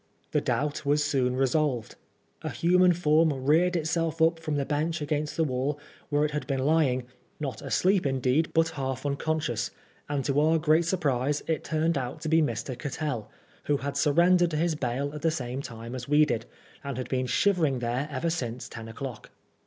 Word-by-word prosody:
The - - +2
doubt 150 +1 -1
was 145 +1 +2
soon 130 -4 +1
resolved. 135 -3 0 0.5
A - - -3
human 180 +1 +4
form 160 -2 +3
reared 155 +7 +2
itself 165 0 -1
up 165 +1 +3
from 155 -2 -3
the 140 -1 0
bench 155 +4 -1
against 150 0 -2
the 165 - +3
wall, 135 +1 -1 0.3
where 145 0 +2
it 150 - -2
had 150 0 -3
been 135 -2 -1
lying, 140 -5 +2 0.4
not 135 -7 -4
asleep 185 -4 +2
indeed, 135 +4 +1
but 165 0 +3
half 135 -3 -4
unconscious; 145 -3 -1 0.4
and 145 -2 -1
to 140 0 +2
our 160 +2 +4
great 160 +1 +3
surprise, 145 -5 0
it 160 -2 -1
turned 160 -1 0
out 130 +4 -5
to 160 - -3
be 160 +1 +4
Mr. 125 -2 -2
Cattell, 145 -4 -4 0.4
who 145 - +2
had 140 +1 -4
surrendered 175 +3 +4
to 155 - -2
his 165 +1 +1
bail 140 0 -2
at 150 - -6
the 165 - +3
same 130 -4 -3
time 115 -2 -8
as 125 -1 -6
we 150 +1 +6
did, 115 -6 -2 0.4
and 140 -3 -4
had 130 - -4
been 130 -1 -1
shivering 155 0 +2
there 125 +4 -2
ever 145 +5 -1
since 125 -7 -4
ten 115 -1 -8
o'clock. 120 +1 -7
145 Hz, 190 wpm, -27 LUFS, 130-160 Hz, 0.5 s, we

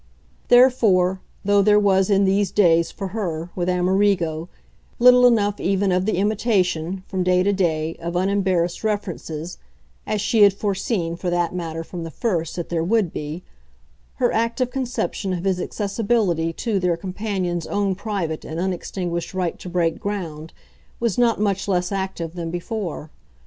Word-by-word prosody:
Therefore, 215 -8 +4 0.2
though 205 0 +4
there 210 +1 +5
was 195 -2 +3
in 200 -1 +4
these 195 0 +2
days, 170 -4 +3
for 195 -2 -6
her, 175 -5 -4
with 180 -1 -1
Amerigo, 180 -3 +1 0.5
little 250 0 +7
enough 205 -4 +2
even 195 +1 +1
of 180 +2 +1
the 215 - +1
imitation, 190 -4 0
from 190 - -3
day 180 0 +3
to 200 +1 +2
day, 165 -4 0
of 170 +1 -5
unembarrassed 185 -2 0
references 180 -6 -4 0.5
as 215 - 0
she 220 +2 +2
had 200 -1 +7
foreseen, 195 -3 -2
for 175 +1 -3
that 175 -1 0
matter, 165 -2 -4
from 170 0 -7
the 165 - -5
first, 165 -5 -2
that 175 -2 -5
there 165 -2 0
would 200 -1 +1
be 155 +4 -5 0.7
her 245 - +1
active 230 +3 0
conception 250 -7 -2
of 175 -1 -3
his 190 -2 0
accessibility 200 -5 0
to 205 +4 -1
their 180 -2 +1
companion's 185 -2 -3
own 200 -1 0
private 185 -6 -3
and 160 +1 -5
unextinguished 180 -1 -3
right 180 -3 -2
to 180 - -8
break 170 -2 0
ground 165 -6 -5 0.5
was 235 -2 0
not 235 -3 +3
much 200 -2 0
less 180 -1 0
active 190 -4 -3
than 170 -2 -4
before. 175 -3 -5
185 Hz, 160 wpm, -22 LUFS, 170-205 Hz, 0.7 s, little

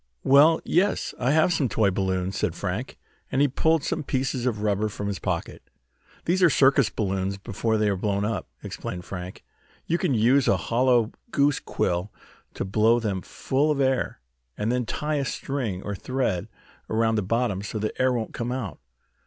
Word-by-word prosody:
"Well, 150 +4 +6
yes, 190 +4 +1
I 125 - +1
have 160 +4 +4
some 140 -6 +1
toy 105 -3 +2
balloons," 95 -1 -1
said - - -1
Frank, - - -4 0.3
and 130 - +1
he 145 - +5
pulled 160 +3 +1
some 160 - -1
pieces 130 -2 -1
of 105 -4 -1
rubber 105 0 +1
from 105 0 -6
his 100 -2 -3
pocket. - - -4 0.6
"These 185 +3 +1
are 180 - +7
circus 135 -4 +4
balloons 95 -1 -2
before 110 +2 -1
they 105 0 +2
are 100 - +1
blown 100 +1 -1
up," 105 -4 -2 0.2
explained 90 0 -6
Frank. 90 -1 -7 0.4
"You 170 - 0
can 160 -9 +1
use 125 +5 +4
a - - +4
hollow 120 -1 +2 0.2
goose 145 -6 +2
quill 90 +3 -2 0.4
to - - -3
blow 110 +4 +3
them 100 -5 -2
full 140 +10 -1
of 150 -2 +1
air, 130 -2 0 0.4
and 105 +2 0
then 125 -2 -1
tie 150 +4 -1
a 140 - 0
string, 125 -9 -3
or 100 - -3
thread, 115 -4 -2 0.4
around 110 0 +2
the 110 - +1
bottom, 110 -1 0
so 105 +2 -5
the 110 0 -2
air 130 0 +4
won't 115 -3 -2
come 120 +1 -3
out. 125 -7 -4
115 Hz, 185 wpm, -25 LUFS, 100-135 Hz, 0.6 s, are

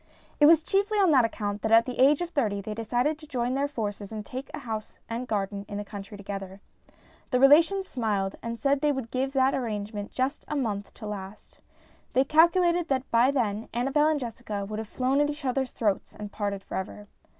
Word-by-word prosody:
It 295 - +7
was 320 0 +6
chiefly 400 +4 +1
on 385 -5 +4
that 260 -5 +5
account 205 -2 -3
that 220 - -1
at 230 +1 +7
the 250 -1 -6
age 280 +4 +5
of 345 -1 -3
thirty 220 -11 0
they 210 +2 -5
decided 245 +7 -1
to 305 - -13
join 250 -2 -1
their 280 +2 +1
forces 210 -6 -5
and 215 -1 -6
take 260 +2 -7
a - - -6
house 220 -2 -6
and 235 +2 -4
garden 200 -2 -2
in 205 - -4
the 205 - -4
country 205 0 -8
together. 195 -1 -7 0.7
The 250 - +2
relations 330 +8 +5
smiled 205 -6 -1
and 230 0 -4
said 275 +4 +1
they 300 -1 +3
would 265 -5 -4
give 265 +1 -1
that 265 0 +3
arrangement 210 -4 -3
just 265 +3 -2
one 290 -3 0
month 205 -3 -3
to 220 - -9
last. 205 -1 -8 0.5
They 260 - +4
calculated 340 +3 +4
that 265 -1 -1
by 235 +3 +5
then 225 -6 -1
Annabel 275 +5 +2
and 310 -1 +2
Jessica 225 -5 -5
would 215 +2 -5
have 220 - -5
flown 265 +3 +1
at 295 - +2
each 295 -1 -6
other's 260 0 0
throats 205 -4 -1
and 210 -1 -7
parted 200 -2 -3
for - - -5
ever. 205 +2 -6
240 Hz, 215 wpm, -27 LUFS, 210-280 Hz, 0.7 s, It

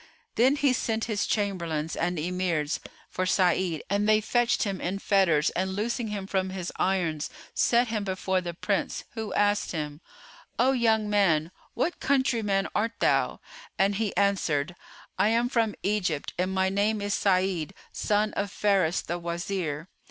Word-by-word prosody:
Then 260 +4 +4
he 285 -3 +2
sent 225 -2 -1
his 210 -3 -1
Chamberlains 170 -7 -1
and 175 +1 -1
Emirs 170 -2 -1 0.3
for 185 0 -2
Sa'id 180 -3 +2
and 205 +2 +1
they 215 0 +6
fetched 240 +2 +1
him 195 -3 -3
in 185 +3 -2
fetters, 190 -7 +3
and 190 +1 -2
loosing 230 +3 -1
him 205 -2 -4
from 190 -1 -1
his 185 -2 -4
irons 165 -6 0 0.2
set 240 0 +3
him 215 -2 -1
before 190 -1 -1
the 175 -1 -5
Prince, 200 +2 -1
who 220 -2 -5
asked 205 -1 +1
him, 150 -1 -4 0.6
"O 260 +2 +4
young 225 -4 +2
man, 175 -6 +2 0.2
what 330 +8 -1
countryman 230 -8 +1
art 225 +2 0
thou?"; - - +1 0.4
and 195 +1 +3
he 210 -4 -2
answered, 175 -6 +1 0.4
"I - - +4
am 235 +2 +2
from 225 -4 +1
Egypt 185 -7 -1
and 185 +1 -1
my 190 0 +1
name 205 +2 +1
is 205 0 -2
Sa'id, 185 -2 +1 0.2
son 210 0 0
of 200 0 -2
Faris 195 -5 +1
the 175 +1 -3
Wazir." 170 -2 -3
195 Hz, 160 wpm, -27 LUFS, 175-215 Hz, 0.6 s, they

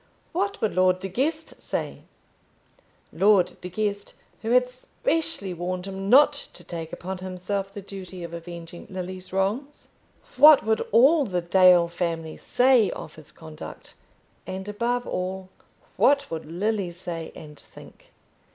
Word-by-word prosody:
What 400 +4 -1
would 220 - 0
Lord 185 0 +3
De 190 - -4
Guest 305 - -3
say - - -4 1.1
Lord 195 -2 +4
De 180 - -6
Guest, 205 +1 -3 0.3
who 225 - -4
had 250 +1 +4
specially 255 - -3
warned 180 +1 -4
him 195 0 -5
not 290 +4 +7 0.2
to 175 - -11
take 165 -2 -7
upon 185 +1 -6
himself 190 +2 -4
the 200 0 -8
duty 185 -2 -8
of 170 0 -7
avenging 170 0 -9
Lily's 185 0 -6
wrongs? 210 +10 -2 0.5
What 300 -4 +8
would 220 0 +1
all 275 +7 +5
the 180 -2 -1
Dale 180 -1 +6
family 165 -2 -3
say 250 -4 +3
of 150 - -7
his 155 -2 -15
conduct? 160 -1 -11 0.5
And, 190 +1 -5
above 240 +4 -1
all, 185 +1 -4 0.5
what 280 -7 +3
would 160 -1 -4
Lily 195 +3 -1
say 170 -2 -6
and 150 -2 -11
think? - - -16
190 Hz, 140 wpm, -25 LUFS, 175-225 Hz, 1.1 s, What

